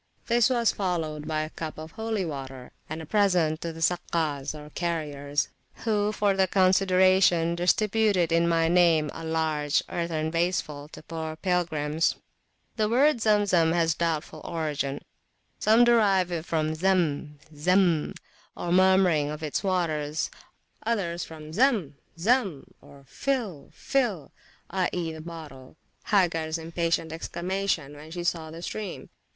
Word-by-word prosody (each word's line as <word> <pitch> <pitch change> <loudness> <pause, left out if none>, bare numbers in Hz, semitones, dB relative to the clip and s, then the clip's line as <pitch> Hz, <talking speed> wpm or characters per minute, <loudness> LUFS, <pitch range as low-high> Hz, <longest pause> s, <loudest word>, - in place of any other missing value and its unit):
This 235 0 +3
was 235 -3 +2
followed 160 -6 -3
by 155 -1 0
a 155 +1 -5
cup 160 -2 -6
of 155 +1 -8
holy 220 -2 -2
water 135 -4 -7 0.2
and 160 +1 -5
a - - -8
present 175 -5 +2
to 170 - -3
the 165 0 -5
Sakkas, 160 -5 -1
or 150 0 -10
carriers, 145 -4 -2 0.4
who 210 -2 +1
for 205 -1 +1
the 190 -1 +2
consideration 185 -2 +4
distributed, 195 0 +2
in 170 +1 +3
my 165 -1 +2
name, 165 -3 +4
a 165 - -8
large 160 -2 0
earthen 160 -2 -2
vaseful 165 -4 -1
to - - -10
poor 160 -1 -5
pilgrims. 165 -3 0 0.6
The 215 -1 +1
word 275 +5 +4
Zemzem 200 -7 +3
has 165 -2 +2
a - - -19
doubtful 160 -2 -2
origin. 150 -4 -3 0.6
Some 225 +3 +5
derive 200 -7 +4
it 165 -1 -3
from 155 -1 0
the 155 - -3
Zam 160 -5 0 0.2
Zam, 175 0 +2 0.4
or 175 - -3
murmuring 185 -5 +4
of 150 +1 -6
its 150 +5 -2
waters, 160 -5 -1 0.5
others 185 -7 -1
from 155 -1 -10
Zam! 210 - +2 0.2
Zam! 195 - +1 0.4
(fill! 225 - -3
fill! 220 - -1 0.4
i.e. 180 -2 -1
the 160 - -8
bottle), 155 -5 -10 0.3
Hagars 165 -6 +1
impatient 165 0 -1
exclamation 175 -3 -2
when 150 +2 -11
she 175 +1 -5
saw 165 -2 -1
the 165 +2 -9
stream. 205 -2 -6
170 Hz, 140 wpm, -27 LUFS, 155-190 Hz, 0.6 s, Some